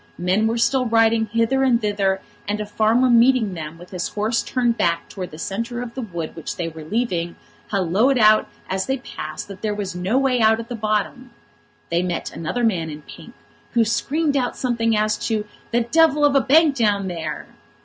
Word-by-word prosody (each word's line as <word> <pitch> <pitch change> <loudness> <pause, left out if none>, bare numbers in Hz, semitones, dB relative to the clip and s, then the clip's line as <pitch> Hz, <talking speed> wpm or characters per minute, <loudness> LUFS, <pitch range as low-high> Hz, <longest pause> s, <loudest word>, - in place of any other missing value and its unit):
Men 185 +5 +1
were 230 +1 0
still 250 +2 +2
riding 225 0 +3
hither 230 +5 +1
and 255 -3 +3
thither; 200 -3 0 0.3
and 205 +1 -1
a 210 - -3
farmer, 220 +4 +2
meeting 240 -3 +4
them, 160 -1 -7
with 175 +1 -14
his 180 -2 -3
horse 215 +3 -1
turned 240 -2 0
back 170 -6 0
towards 185 -2 -6
the 155 - -11
centre 230 +8 -4
of 235 -1 -8
the 260 - -5
wood 170 -8 -6
which 165 - -6
they 170 - -3
were 160 -1 -8
leaving, 175 -3 -2 0.3
halloaed 205 +7 +2
out 215 -1 +5 0.2
as 190 0 -2
they 265 0 0
passed 155 -10 -7
that 195 -1 -10
there 210 -1 -1
was 200 -3 -4
no 185 +7 0
way 265 -3 +2
out 220 0 +4
at 230 +1 -7
the 245 - -4
bottom. 215 +3 -2 0.6
They 170 +1 +2
met 180 -1 -3
another 205 +9 -3
man 180 -8 +1
in 150 0 -9
pink, - - -13 0.4
who 235 -1 +3
screamed 290 +6 0
out 255 -3 -1
something 230 -3 0
as 215 0 +1
to 215 -2 -1 0.2
"the 240 +1 +1
devil 300 +4 +3
of 290 - +3
a 275 - +4
bank 305 +2 +4
down 205 -5 +1
there." 160 -4 -5
220 Hz, 200 wpm, -21 LUFS, 185-240 Hz, 0.6 s, out